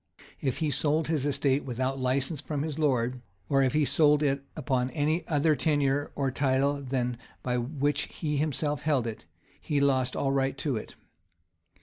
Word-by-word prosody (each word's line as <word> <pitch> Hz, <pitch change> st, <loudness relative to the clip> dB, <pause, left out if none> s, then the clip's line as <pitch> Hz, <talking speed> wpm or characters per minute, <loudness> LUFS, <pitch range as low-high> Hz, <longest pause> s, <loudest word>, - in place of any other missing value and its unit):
[] -, -, -24 dB
If -, -, -9 dB
he 155 Hz, -3 st, 0 dB
sold 155 Hz, +2 st, +1 dB
his 150 Hz, -3 st, +1 dB
estate 140 Hz, -1 st, +1 dB
without 130 Hz, +1 st, -2 dB
license 135 Hz, +3 st, 0 dB
from 145 Hz, -1 st, -3 dB
his 155 Hz, -1 st, -4 dB
lord,[] 125 Hz, -4 st, +1 dB, 0.3 s
or 135 Hz, -1 st, +3 dB
if 130 Hz, 0 st, +2 dB
he 150 Hz, -1 st, +3 dB
sold 150 Hz, 0 st, +4 dB
it 140 Hz, -1 st, +1 dB
upon 125 Hz, 0 st, 0 dB
any 155 Hz, +4 st, 0 dB
other 155 Hz, 0 st, +3 dB
tenure 145 Hz, 0 st, +1 dB
or 135 Hz, -2 st, 0 dB
title 140 Hz, +1 st, +1 dB
than 125 Hz, -2 st, -1 dB
that 120 Hz, -, -9 dB, 0.2 s
by 125 Hz, -1 st, 0 dB
which 145 Hz, +3 st, -1 dB
he 150 Hz, -3 st, -3 dB
himself 150 Hz, 0 st, 0 dB
held 145 Hz, -5 st, +1 dB
it,[] 115 Hz, -2 st, -6 dB, 0.3 s
he 145 Hz, -, 0 dB
lost 130 Hz, -2 st, +2 dB
all 135 Hz, -, 0 dB
right 135 Hz, 0 st, 0 dB
to 140 Hz, -2 st, -1 dB
it. 110 Hz, -, -6 dB
140 Hz, 185 wpm, -28 LUFS, 130-150 Hz, 0.3 s, sold